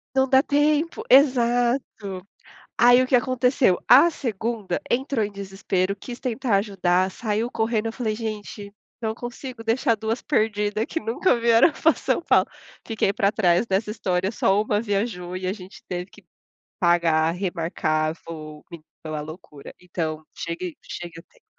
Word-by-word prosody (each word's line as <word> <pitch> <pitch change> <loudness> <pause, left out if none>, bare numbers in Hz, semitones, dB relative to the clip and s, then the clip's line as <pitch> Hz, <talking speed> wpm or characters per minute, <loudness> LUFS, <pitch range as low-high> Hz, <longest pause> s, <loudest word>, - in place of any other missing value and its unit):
Não 265 0 +3
dá 265 +1 +5
tempo 300 +2 +1
exato. 240 -7 +2 0.5
Aí 245 +1 +6
o 255 - 0
que 255 - +3
aconteceu, 250 -5 +2
a 290 +7 +8
2ª 225 - -3
entrou 260 -2 0
em 205 - -7
desespero, 195 -1 -2
quis 240 +4 -9
tentar 245 -4 0
ajudar, 190 -2 +1
saiu 220 +3 -2
correndo, 225 -1 -1
eu 225 - -4
falei: 220 -4 -2
"Gente, 210 -2 -6 0.3
não 220 0 -2
consigo 240 -1 -8
deixar 230 +1 +1
2 220 +2 -3
perdida 210 0 0
que 325 - -3
nunca 235 +2 +1
vieram 230 +6 +5
pra 320 - +3
São - - -1
Paulo. - - +3 0.4
Fiquei 210 -3 0
para 200 +1 +2
trás 180 0 +2
dessa 200 +1 -1
história, 190 -2 -1
só 205 -1 +2
1 215 0 0
viajou, 200 -4 -2
e 185 0 -4
a 190 - 0
gente 185 -2 -12
teve 180 +1 -5
que 210 - -18 0.5
pagar, 165 -2 +3
remarcar 165 -3 -1
voo, 155 -2 -9
me 170 -2 -10 0.2
pela 155 -2 -5
loucura. 150 -2 -11
Então 160 -3 -4
chegue 170 0 -5
chegue 170 -1 -8
a - - -14
tempo. - - -30
210 Hz, 155 wpm, -23 LUFS, 180-240 Hz, 0.5 s, a